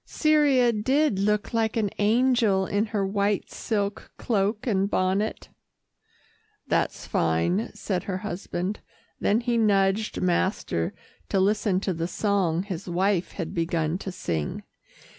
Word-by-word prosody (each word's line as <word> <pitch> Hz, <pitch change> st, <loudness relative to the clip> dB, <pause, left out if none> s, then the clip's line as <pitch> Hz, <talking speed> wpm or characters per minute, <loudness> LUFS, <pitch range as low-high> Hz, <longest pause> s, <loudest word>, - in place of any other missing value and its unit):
Cyria 290 Hz, -6 st, +3 dB
did 260 Hz, +1 st, +1 dB
look 210 Hz, +2 st, 0 dB
like 225 Hz, -1 st, +1 dB
an 210 Hz, -3 st, 0 dB
angel 220 Hz, -3 st, +3 dB
in 205 Hz, +3 st, 0 dB
her 205 Hz, -2 st, -1 dB
white 200 Hz, 0 st, 0 dB
silk 205 Hz, -3 st, -3 dB
cloak 210 Hz, -1 st, 0 dB
and 200 Hz, -4 st, +1 dB
bonnet." 195 Hz, +3 st, 0 dB, 1.2 s
"That's -, -, -1 dB
fine," 85 Hz, -, +1 dB
said 185 Hz, -3 st, -3 dB
her 185 Hz, -2 st, -2 dB
husband, 180 Hz, +1 st, -3 dB, 0.4 s
then 215 Hz, +4 st, +2 dB
he 240 Hz, -1 st, 0 dB
nudged 200 Hz, 0 st, +2 dB
master 175 Hz, -, 0 dB, 0.3 s
to 195 Hz, -, +1 dB
listen 200 Hz, -1 st, +2 dB
to 190 Hz, -, -1 dB
the 165 Hz, 0 st, -2 dB
song 185 Hz, -3 st, 0 dB
his 190 Hz, -2 st, -6 dB
wife 185 Hz, +1 st, 0 dB
had 170 Hz, -5 st, -5 dB
begun 165 Hz, 0 st, -1 dB
to 190 Hz, -, -5 dB
sing. 80 Hz, -, -3 dB
200 Hz, 130 wpm, -26 LUFS, 185-215 Hz, 1.2 s, Cyria